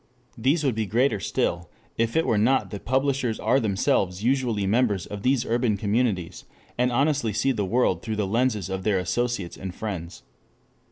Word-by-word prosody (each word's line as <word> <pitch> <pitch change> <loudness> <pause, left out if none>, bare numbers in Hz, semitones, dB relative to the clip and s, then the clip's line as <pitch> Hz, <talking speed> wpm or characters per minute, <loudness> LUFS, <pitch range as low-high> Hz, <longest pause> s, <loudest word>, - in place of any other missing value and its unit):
These 140 +7 +1
would 135 -3 +2
be 110 -1 -2
greater 115 0 +2
still 85 -3 -1 0.3
if 115 0 0
it 160 - +3
were 110 - +2
not 130 +5 +2
that 100 - -7
publishers 130 -2 0
are 135 - +2
themselves 95 -3 0
usually 120 -5 +1
members 105 -3 +1
of 105 -1 -7
these 130 +1 +1
urban 115 -3 +1
communities, 105 -4 -1 0.3
and 125 +1 +1
honestly 135 -3 +1
see 115 +6 +1
the 105 -6 -1
world 95 -4 +1
through 110 -2 -3
the 105 -1 0
lenses 110 -1 0
of 95 0 -3
their 100 0 +1
associates 100 +1 -2
and 95 -2 -7
friends. 90 -6 -6
110 Hz, 175 wpm, -25 LUFS, 100-125 Hz, 0.3 s, it